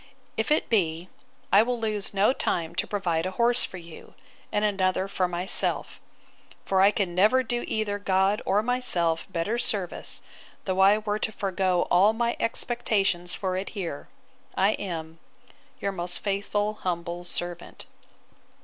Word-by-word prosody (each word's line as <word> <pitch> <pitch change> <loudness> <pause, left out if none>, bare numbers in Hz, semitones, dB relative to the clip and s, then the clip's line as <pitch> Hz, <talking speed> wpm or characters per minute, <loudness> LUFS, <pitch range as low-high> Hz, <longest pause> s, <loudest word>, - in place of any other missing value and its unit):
If - - -1
it 305 - +3
be, 175 -5 0 0.4
I 200 - +8
will 245 +1 -1
lose 215 -3 -2
no 200 +5 +3
time 170 -9 -1
to - - -2
provide 180 -4 -1
a 185 - -7
horse 240 +1 +3
for 190 - -8
you, 170 -2 -12 0.4
and 210 0 +1
another 190 -2 +1
for 190 -2 0
myself; 180 +2 -2 0.7
for 190 -1 +2
I 195 - +7
can 200 -4 -1
never 215 +8 +4
do 240 0 -2
either 205 -2 -1
God 195 +1 +2
or 205 +2 +2
myself 185 -10 0
better 205 +8 -1
service, 195 -7 0 0.4
though 190 -1 -1
I 195 +2 +6
were 210 -1 -2
to 220 - -1
forego 190 -3 0
all 195 +5 +5
my 235 +1 0
expectations 200 -7 0
for 185 -2 -2
it 190 +2 -3
here, 170 -7 -4 0.5
I 195 +2 +4
am 165 -6 -5 0.6
'Your 200 - -1
most 175 -1 0
faithful 205 +1 -1
humble 175 -1 -3
servant. 175 0 -4
195 Hz, 150 wpm, -26 LUFS, 175-210 Hz, 0.7 s, I